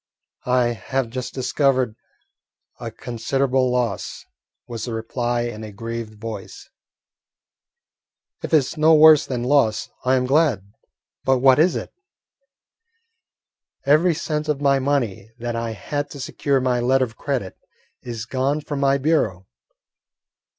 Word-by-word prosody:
"I 125 -1 +3
have 120 +2 -3
just 125 0 -4
discovered 130 -3 +1 0.8
a - - -5
considerable 130 +2 -1
loss," 125 -4 -2 0.4
was 115 -2 -5
the 120 -2 -4
reply 120 +1 -2
in 120 -2 -5
a 110 - -7
grieved 115 0 -6
voice. 110 -3 -8 1.7
"If - - -5
it 160 - +7
is 140 +2 -2
no 155 +1 +5
worse 155 -1 +7
than 125 -2 -3
loss, 125 -5 +2
I 130 +1 +3
am 125 -1 +1
glad; 130 - +1 0.5
but 135 0 +3
what 130 +1 +5
is 170 +3 +4
it?" - - -5 1.9
"Every 155 +4 +4
cent 155 -1 -3
of 150 -2 0
money 135 -7 0
that 120 0 -4
I 115 -1 -3
had 145 +6 -4
to 140 - -9
secure 135 +2 0
my 125 -1 +1
letter 130 +2 +2
of 115 -1 -13
credit 125 -10 -3 0.5
is 115 -2 -6
gone 135 +4 -1
from 145 -1 -5
my 140 0 +3
bureau." 130 - 0
130 Hz, 135 wpm, -22 LUFS, 115-140 Hz, 1.9 s, it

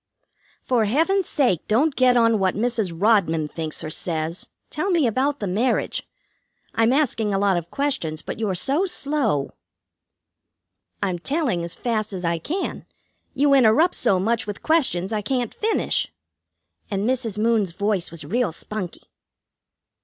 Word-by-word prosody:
"For 240 -4 +2
Heaven's 330 - +1
sake, 245 - +1
don't 275 +7 +2
get 250 -1 +4
on 230 -2 +4
what 190 -1 +1
Mrs. 220 -3 -1
Rodman 165 -4 +2
thinks 155 0 -4
or 155 - -5
says. 165 +1 -3 0.2
Tell 310 +6 -2
me 340 -6 +3
about 265 +5 0
the 205 - -2
marriage. 215 +7 -1 0.6
I'm 225 +1 +3
asking 250 -7 +1
a 195 - +1
lot 195 -1 +2
of 170 -1 -3
questions, 170 - -2
but - - -6
you're 205 -4 -1
so 280 - +2
slow." 275 - 0 1.5
"I'm 185 -3 -1
telling 255 - -1
as 170 - -5
fast 215 -3 -2
as 180 -2 -4
I 170 0 0
can. 340 - -4 0.5
You 280 +1 +3
interrupt 275 +7 +5
so 190 - +2
much 225 +3 0
with 205 - -6
questions 230 - +1
I 215 - 0
can't 245 +1 -2
finish." 440 +1 0 0.8
And 200 +1 -1
Mrs. 240 -5 -1
Moon's 215 -4 +2
voice 200 -2 0
was 165 -2 -7
real 235 -2 0
spunky. 185 +2 -6
220 Hz, 150 wpm, -23 LUFS, 185-265 Hz, 1.5 s, interrupt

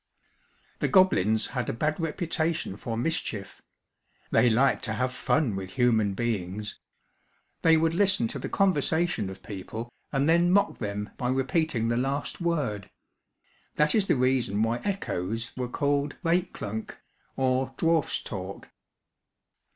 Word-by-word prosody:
The - - +1
goblins 110 - +4
had 125 -3 -3
a - - -1
bad 150 +8 -1
reputation 165 - -1
for 115 +2 -4
mischief. 115 -7 -3 0.7
They 125 - +5
liked 130 +4 +3
to 110 - -2
have 125 +4 -1
fun 130 -3 +1
with 95 -1 -6
human 110 -6 +2
beings. 105 -2 -3 0.8
They 160 0 +6
would 165 +1 +2
listen 195 +4 +2
to - - -5
the - - -5
conversation 170 - +1
of 95 0 -10
people 110 +4 -6 0.2
and 140 0 +1
then 170 +2 +4
mock 200 +2 +2
them 105 -1 -4
by 125 -2 -1
repeating 130 -1 +1
the 120 0 +1
last 135 +6 -2
word. 140 - -1 0.9
That 150 0 +3
is 205 -3 +2
the - - +3
reason 125 -5 +1
why 115 +1 +1
echoes 115 - -3
were 125 -1 -3
called 145 +2 0
"week 175 +1 +1
klank," 110 +1 -5 0.4
or 130 0 0
dwarf's 165 -2 +1
talk. 95 -2 -7
130 Hz, 140 wpm, -27 LUFS, 110-160 Hz, 0.9 s, They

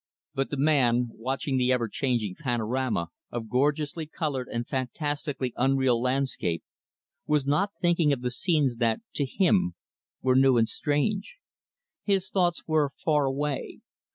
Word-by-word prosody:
But 135 0 -1
the 145 - -3
man 125 -5 +3
watching 130 +3 -2
the 125 0 +2
ever 120 -2 +1
changing 115 -5 -1
panorama 120 - -1 0.2
of 115 -2 -5
gorgeously 150 +5 0
colored 145 -5 -3
and 120 0 -4
fantastically 135 0 -2
unreal 130 -2 +2
landscape 125 -10 -1 0.6
was 150 -2 +2
not 185 +9 +1
thinking 170 -4 +3
of 135 -3 0
the 125 0 -1
scenes 145 -4 +1
that, 115 -2 +1
to 145 - 0
him, 95 - +2 0.5
were 130 -1 +3
new 135 -1 +5
and 115 -1 +3
strange. 195 - -1 0.7
His 195 -2 0
thoughts 175 -3 +1
were 155 -3 +2
far 150 -3 +2
away. 140 +1 -2
135 Hz, 140 wpm, -27 LUFS, 125-150 Hz, 0.7 s, new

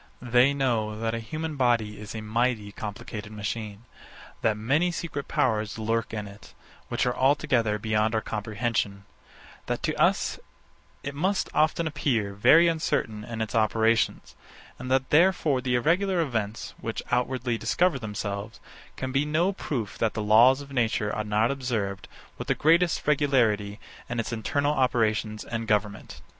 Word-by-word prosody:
They 125 +2 +4
know 115 -6 -1
that 115 0 -1
a 115 - -2
human 155 +7 -5
body 115 -5 +1
is 105 +1 -8
a 110 - -4
mighty 110 -1 -1
complicated 105 0 -7
machine: 105 0 -5 0.6
That 110 -1 +1
many 140 +11 +1
secret 160 -5 -5
powers 110 -3 0
lurk 115 +1 -1
in 105 -2 -4
it, 100 0 -14 0.3
which - - -1
are 125 - 0
altogether 130 -5 +2
beyond 110 +1 0
our 110 - +1
comprehension: 105 -2 -2 0.6
That - - -2
to - - 0
us - - +2 0.6
it 140 - -4
must 190 +7 0
often 155 +2 +2
appear 130 -10 -1
very 160 +12 +6
uncertain 130 -9 -1
in 115 0 -5
its 110 - -6
operations: 110 0 +1 0.4
And 130 +1 -6
that 130 0 +1
therefore 155 -5 +3
the 125 -1 0
irregular 180 +8 +2
events, 115 -8 -2
which 115 - -4
outwardly 125 -1 0
discover 175 -6 +1
themselves, 105 -1 -5 0.4
can 130 0 -3
be 135 +2 +2
no 160 +6 +1
proof 125 - -4
that 115 -2 0
the 110 - -2
laws 120 +6 +6
of 140 0 -11
nature 110 -5 0
are 110 - -2
not 105 +3 +1
observed 115 -8 -3 0.3
with - - -5
the - - +2
greatest 170 +2 +3
regularity 120 -8 +2 0.3
in 120 0 -2
its 115 +1 -3
internal 140 +6 0
operations 110 -5 0
and 115 -1 -4
government. 105 -1 -1
115 Hz, 155 wpm, -26 LUFS, 105-140 Hz, 0.6 s, very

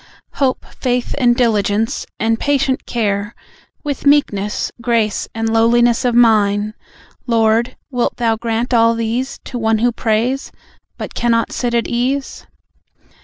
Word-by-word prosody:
Hope, 265 -2 0
faith 250 -1 -1
and 240 -2 +4
diligence, 220 -2 0
and 225 +1 +1
patient 275 -2 0
care, 205 -2 -1 0.5
With 285 -1 -3
meekness, 210 -8 +1
grace, 230 -3 0
and 225 0 -1
lowliness 230 +2 +3
of 245 -1 +1
mind. 215 -3 +3 0.5
Lord, 225 0 +2
wilt 245 -2 -1
Thou 230 -2 +1
grant 230 +2 -2
all 230 0 +4
these 230 +4 -2
To 245 - -6
one 225 -1 +2
who 240 +3 +2
prays, 235 +4 -1 0.5
but - - -6
cannot 230 -1 +1
sit 240 -1 -2
at 235 - +1
ease? 260 +3 -2
235 Hz, 130 wpm, -17 LUFS, 225-245 Hz, 0.5 s, and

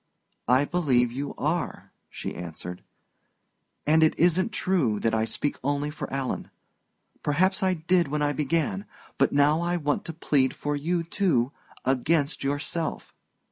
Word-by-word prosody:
"I 130 +4 +4
believe 130 -9 +2
you 140 +3 -4
are," 165 +4 -2 0.2
she - - -5
answered. 90 +1 -7 1.0
"And 160 +2 +4
it 160 - +4
isn't 180 +6 +3
true 160 - +1
that 115 +1 0
I 110 0 +2
speak 140 +6 -2
only 145 +2 0
for 150 - -6
Alan. 135 -1 -3 0.7
Perhaps 185 +7 +2
I 185 -1 +2
did 175 +1 +2
when 150 +1 -1
I 145 0 +1
began; 165 +8 -1 0.3
but - - +4
now 145 +3 +4
I 175 +1 0
want 150 -3 0
to 165 - -5
plead 140 -4 +1
for 145 0 -2
you 165 +4 0
too 165 -8 +1 0.3
against 140 +3 +1
yourself." 145 +4 -2
150 Hz, 145 wpm, -26 LUFS, 135-170 Hz, 1.0 s, I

